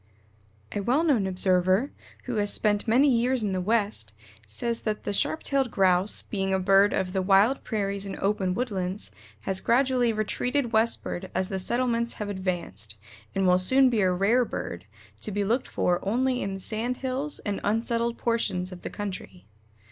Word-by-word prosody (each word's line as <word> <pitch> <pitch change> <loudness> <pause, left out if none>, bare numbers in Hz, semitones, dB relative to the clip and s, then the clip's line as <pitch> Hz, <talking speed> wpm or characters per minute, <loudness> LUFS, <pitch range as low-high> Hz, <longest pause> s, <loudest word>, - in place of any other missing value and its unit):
C. - - -34
C. 105 - -15
M. - - -1
A - - -8
well 270 +7 +2
known 255 - +2
observer, 185 +5 +2 0.3
who 245 -3 -3
has 205 -1 +1
spent 210 0 +1
many 255 +6 +4
years 250 -1 +2
in 205 - 0
the 185 -1 -1
West, 200 - 0 0.3
says 230 - -2
that 215 -1 -3
the 205 - -2
Sharp 315 +9 0
tailed 275 -3 +1
Grouse, 190 0 +2
being 195 -2 -2
a - - +1
bird 195 +2 +4
of 185 -1 -1
the 190 - +1
wild 200 +7 +3
prairies 200 -2 -1
and 195 - -5
open 195 -2 0
woodlands, 195 - -3 0.3
has 190 +6 -1
gradually 250 -1 +2
retreated 235 +4 -1
westward 220 -4 0
as 185 +1 0
the 190 -2 -2
settlements 235 +3 0
have 210 -1 -5
advanced, 175 - -3 0.4
and 195 - +1
will 180 0 +5
soon 260 +7 +4
be 225 -3 +1
a 185 -1 +3
rare 200 +8 +3
bird, 90 - -5 0.3
to - - -4
be 205 +1 -1
looked 235 +6 0
for 175 0 0
only 250 +5 0
in 195 0 -3
the - - -7
sand 230 +5 -2
hills 270 +3 0
and 205 -2 -4
unsettled 230 +2 0
portions 195 -6 -1
of 180 -1 -9
the - - -5
country. 185 - -7
205 Hz, 185 wpm, -26 LUFS, 185-235 Hz, 0.4 s, will